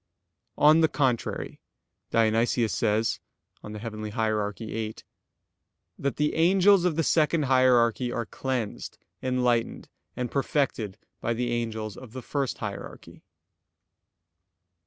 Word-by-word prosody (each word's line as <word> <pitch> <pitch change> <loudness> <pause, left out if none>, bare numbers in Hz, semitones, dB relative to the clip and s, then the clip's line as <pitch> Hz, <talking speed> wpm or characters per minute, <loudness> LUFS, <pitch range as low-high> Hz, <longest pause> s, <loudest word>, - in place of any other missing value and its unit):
On 155 +2 +6
the 160 - +5
contrary, 130 -6 -1 0.5
Dionysius 115 +1 +2
says 110 0 +1 0.4
(Coel. 105 - -8
Hier. 110 -1 -2
viii) 110 -1 -4 1.0
that 140 0 -1
"the 150 0 0
angels 185 +3 +4
of 175 -4 +1
the 165 - +1
second 155 0 +2
hierarchy 125 -2 +3
are 115 - -2
cleansed, 125 -5 -4 0.2
enlightened 125 -2 0 0.3
and 125 -1 -3
perfected 135 -8 -1 0.2
by 115 - -1
the 120 +1 -1
angels 110 -3 -3
of 120 -3 -11
the 130 -1 -7
first 140 -2 -2
hierarchy." - - -8
120 Hz, 110 wpm, -27 LUFS, 110-140 Hz, 1.0 s, On